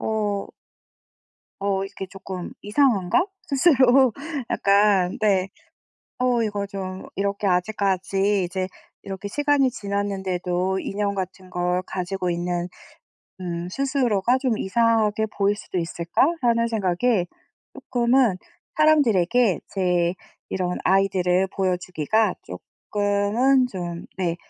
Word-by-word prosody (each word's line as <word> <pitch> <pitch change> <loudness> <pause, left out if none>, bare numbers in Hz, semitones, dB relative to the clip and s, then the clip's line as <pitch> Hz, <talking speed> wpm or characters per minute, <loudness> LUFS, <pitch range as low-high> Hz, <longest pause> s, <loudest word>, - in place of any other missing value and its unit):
'어' 210 -2 -1 1.1
'어 195 -1 0
이렇게 195 0 -7
쪼끔 190 -1 -7
이상한가?' 215 - +2 0.2
스스로 270 -5 +4 0.4
약간 200 -2 +3
네 195 -3 +2 0.7
'어 250 -2 +2
이거 205 -2 -2
좀 190 -2 -6
이렇게 200 +1 -1
아직까지 195 +1 +1
이제 185 +1 -3 0.3
이렇게 195 +1 -6
시간이 285 +1 +2
지났는데도 190 -4 -2
인형 200 0 -2
같은 185 -1 -5
걸 180 0 0
가지고 185 0 -3
있는 175 0 -2 0.7
음 175 -1 -4
스스로가 255 -1 +1
좀 255 -4 0
이상하게 220 0 +2
보일 205 +1 +2
수도 190 - -5
있을까?'라는 230 - +1
생각에 205 -1 +1 0.5
쪼끔은 240 -4 +2 0.4
사람들에게 245 - +3
제 180 -2 +1 0.3
이런 180 -1 -2
아이들을 190 -1 +2
보여주기가 185 +2 0 0.6
쪼끔은 210 +6 +2
좀 175 -2 -5
네 175 -3 -1
200 Hz, 240 characters per minute, -23 LUFS, 185-230 Hz, 1.1 s, 스스로